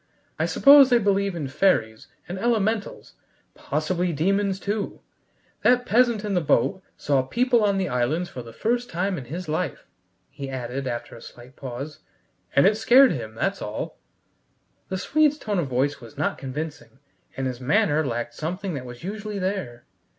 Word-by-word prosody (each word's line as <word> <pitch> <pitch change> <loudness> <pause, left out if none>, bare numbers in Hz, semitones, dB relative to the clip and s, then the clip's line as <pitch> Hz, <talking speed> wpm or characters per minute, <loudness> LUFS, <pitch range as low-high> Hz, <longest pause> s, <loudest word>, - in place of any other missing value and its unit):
I - - +1
suppose 280 -1 +7
they 245 - +5
believe 200 -3 +1
in 150 -5 -3
fairies 120 - +1 0.2
and 180 +2 -5
elementals, 220 -2 -1 0.4
possibly 170 +4 -1
demons 195 +5 0
too. 205 +1 -3 0.6
That 250 0 +4
peasant 235 -2 +2
in 205 - -2
the 180 - +2
boat 190 +4 +1 0.2
saw 140 -2 +1
people 240 - +2
on 200 -1 +2
the 190 -1 0
islands 130 +8 0
for 125 - -8
the 115 -1 -11
first 240 - -1
time 185 +3 -1
in 130 - -9
his 170 +7 -6
life," 155 -1 -3 0.5
he 140 -1 -7
added, 130 +1 -4
after 120 -1 -5
a 115 - -12
slight 125 +2 -13
pause, 135 +3 -7 0.6
"and 140 - +6
it 210 +2 +4
scared 250 +4 +6
him, 110 -3 -5
that's 195 - -1
all." 105 +1 -5 0.9
The 190 - -2
Swede's 300 +8 +2
tone 210 -9 -2
of 160 - -1
voice 135 +3 0
was 115 -2 -13
not - - -1
convincing, 150 +1 -6 0.4
and 135 - -2
his 130 -1 -4
manner 155 - +2
lacked 120 -3 -3
something 180 +7 -4
that 135 -4 -5
was 120 +2 -10
usually 210 +2 -5
there. 185 -11 -3
175 Hz, 170 wpm, -24 LUFS, 130-205 Hz, 0.9 s, suppose